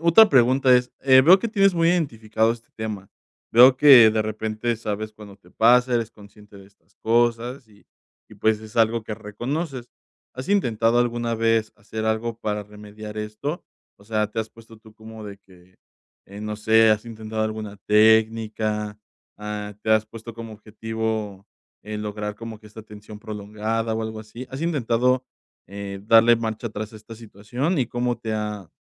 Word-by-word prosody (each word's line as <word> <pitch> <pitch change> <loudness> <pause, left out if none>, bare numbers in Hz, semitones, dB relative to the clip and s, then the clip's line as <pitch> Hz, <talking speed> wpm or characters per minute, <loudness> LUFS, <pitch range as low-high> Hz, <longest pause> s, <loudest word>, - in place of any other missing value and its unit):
Otra 170 +7 +6
pregunta 130 0 +4
es, 125 0 -1
eh, 130 -1 +6
veo 175 +8 +7
que 230 - -3
tienes 195 -4 +3
muy 165 0 +2
identificado 115 -9 0
este 115 -1 -13
tema, 105 -3 -6 0.4
veo 125 +3 +7
que 130 -6 +8
de 110 0 0
repente 110 +2 -3
sabes 110 -1 -5
cuando 105 -2 -13
te 90 -3 -23
pasa, 125 +4 +4
eres 115 -1 -1
consciente 105 -1 -17
de 95 - -15
estas 100 0 -30
cosas, 120 +2 0
y 105 -1 -23 0.4
y - - -14
pues, 110 -1 +1
es 110 +1 -13
algo 115 0 +2
que 110 - -7
reconoces, 125 +5 -5 0.4
¿has 130 +5 -7
intentado 120 - +2
alguna 120 -1 -1
vez 115 -1 +1
hacer 110 +1 -7
algo 110 +1 -2
para 105 -2 -3
remediar 105 +1 -10
esto? 105 +10 -5 0.3
O 100 - -19
sea, 110 -1 -1
te 115 - -6
has 110 0 -2
puesto 115 0 -17
tú 110 0 -18
como 110 0 -11
de 100 -1 -9
que, 95 -1 -22 0.5
eh, 100 +2 -10
no 105 0 -4
sé, 110 +1 +4
¿has 110 +2 +1
intentado 110 -1 -5
alguna 110 -1 -4
técnica? 110 -1 +2 0.4
Ah, 105 0 -6
¿te 110 - -2
has 110 0 +3
puesto 115 +1 -10
como 115 -1 -9
objetivo, 110 -2 -5 0.4
en 105 0 -6
lograr 105 0 -5
como 115 -1 -9
que 105 - -15
esta 110 +1 -11
tensión 105 0 -12
prolongada 110 +2 -4
o 110 - -2
algo 110 0 -5
así? 115 +4 -10
¿Has 130 +2 -7
intentado, 125 -5 +1 0.4
eh, 100 0 -7
darle 115 +1 +6
marcha 115 0 -4
tras 105 +1 -7
esta 110 +1 -12
situación? 120 - -3
¿Y 125 - +1
cómo 120 0 -2
te 110 -2 -5
ha 105 -4 -4
110 Hz, 175 wpm, -23 LUFS, 105-120 Hz, 0.5 s, que